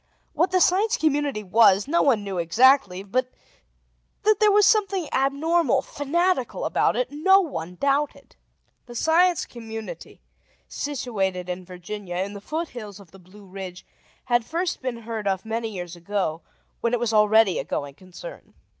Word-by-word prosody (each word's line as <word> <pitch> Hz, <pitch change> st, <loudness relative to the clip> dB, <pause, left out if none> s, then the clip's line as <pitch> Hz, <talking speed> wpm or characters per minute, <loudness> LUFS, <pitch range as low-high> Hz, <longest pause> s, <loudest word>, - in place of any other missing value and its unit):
What 360 Hz, -, +2 dB
the 370 Hz, -, +2 dB
Science 410 Hz, +5 st, +3 dB
Community 290 Hz, -7 st, 0 dB
was, 200 Hz, 0 st, +4 dB
no 335 Hz, +4 st, +2 dB
one 240 Hz, -7 st, +2 dB
knew 195 Hz, -3 st, -4 dB
exactly; 195 Hz, -, +3 dB
but 250 Hz, +6 st, -1 dB, 0.9 s
that 430 Hz, 0 st, +3 dB
there 425 Hz, -1 st, +5 dB
was 415 Hz, 0 st, +5 dB
something 395 Hz, -5 st, +2 dB
abnormal, 280 Hz, +1 st, +1 dB
fanatical, 310 Hz, 0 st, -1 dB
about -, -, +1 dB
it, -, -, -1 dB
no 380 Hz, +7 st, +4 dB
one 180 Hz, -, -4 dB
doubted. 280 Hz, +6 st, -1 dB, 0.5 s
The 240 Hz, -, -10 dB
Science 340 Hz, +6 st, +3 dB
Community, 225 Hz, -, -9 dB, 0.5 s
situated 195 Hz, -10 st, -3 dB
in 180 Hz, 0 st, -5 dB
Virginia, 180 Hz, +1 st, -7 dB
in 190 Hz, +3 st, -2 dB
the 200 Hz, -, -9 dB
foothills 240 Hz, -, -6 dB
of 190 Hz, -5 st, -16 dB
the 195 Hz, -, -15 dB
Blue 190 Hz, +3 st, -16 dB
Ridge, 185 Hz, -1 st, -9 dB, 0.4 s
had 240 Hz, -1 st, +2 dB
first 345 Hz, +8 st, -3 dB
been 255 Hz, -2 st, -3 dB
heard 220 Hz, -2 st, -5 dB
of 190 Hz, 0 st, -1 dB
many 225 Hz, 0 st, -3 dB
years 175 Hz, -4 st, -7 dB
ago, 175 Hz, -2 st, -3 dB, 0.4 s
when 235 Hz, 0 st, -1 dB
it -, -, -2 dB
was 230 Hz, -1 st, -1 dB
already 215 Hz, -2 st, +4 dB
a -, -, -2 dB
going 140 Hz, -1 st, -4 dB
concern. 185 Hz, -, -12 dB
230 Hz, 155 wpm, -24 LUFS, 195-315 Hz, 0.9 s, there